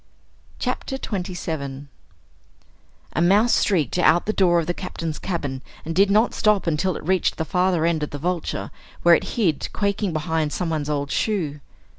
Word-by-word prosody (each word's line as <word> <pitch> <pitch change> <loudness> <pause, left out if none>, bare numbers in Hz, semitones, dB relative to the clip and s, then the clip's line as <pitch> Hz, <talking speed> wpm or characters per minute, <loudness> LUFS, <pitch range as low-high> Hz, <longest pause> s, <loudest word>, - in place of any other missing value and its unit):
CHAPTER 265 - -3
27 160 - -4 1.3
A 155 - 0
mouse 205 +7 +4
streaked 175 - +1
out 175 -1 +4
the 215 - 0
door 180 -4 +4
of 165 - -1
the 175 - -1
Captain's 165 -4 -5
cabin 145 -8 -3 0.2
and 165 - -3
did 195 +4 +4
not 215 +4 +3
stop 210 -2 +2
until 170 +2 0
it - - -9
reached 185 0 +1
the 160 - -2
farther 180 0 +1
end 165 -2 +1
of 150 - -2
the 145 - -6
Vulture, 175 +2 -3 0.3
where 175 - +7
it - - +1
hid 175 -10 +1
quaking 200 -1 0
behind 160 -1 -1
someone's 160 -4 -2
old 145 -1 -2
shoe. 165 -10 -1
170 Hz, 165 wpm, -23 LUFS, 155-190 Hz, 1.3 s, where